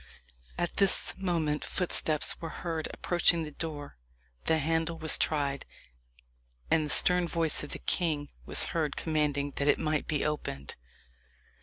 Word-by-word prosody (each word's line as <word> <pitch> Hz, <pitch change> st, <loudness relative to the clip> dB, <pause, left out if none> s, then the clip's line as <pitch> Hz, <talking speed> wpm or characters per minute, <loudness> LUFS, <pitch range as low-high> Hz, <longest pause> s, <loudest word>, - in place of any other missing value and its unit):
At 175 Hz, -, -2 dB
this 195 Hz, -1 st, +4 dB
moment 165 Hz, -6 st, -1 dB
footsteps 160 Hz, -4 st, 0 dB
were 165 Hz, -, -4 dB, 0.2 s
heard 165 Hz, -2 st, -2 dB
approaching 175 Hz, -1 st, +1 dB
the 150 Hz, -, -7 dB
door 145 Hz, -2 st, -6 dB, 0.5 s
the 160 Hz, -, +3 dB
handle 165 Hz, +2 st, -1 dB
was 160 Hz, -1 st, +3 dB
tried 140 Hz, -3 st, -1 dB, 1.1 s
and 160 Hz, -, +4 dB
the 150 Hz, -, -4 dB
stern 180 Hz, +2 st, +5 dB
voice 165 Hz, -3 st, +1 dB
of 145 Hz, -, -7 dB
the -, -, -5 dB
king 155 Hz, -5 st, 0 dB
was -, -, +3 dB
heard 155 Hz, -4 st, -1 dB
commanding 150 Hz, -3 st, -1 dB
that 140 Hz, -, 0 dB
it -, -, +4 dB
might 155 Hz, -1 st, -1 dB
be 150 Hz, -2 st, -1 dB
opened. 110 Hz, -, -4 dB
155 Hz, 145 wpm, -29 LUFS, 150-165 Hz, 1.1 s, stern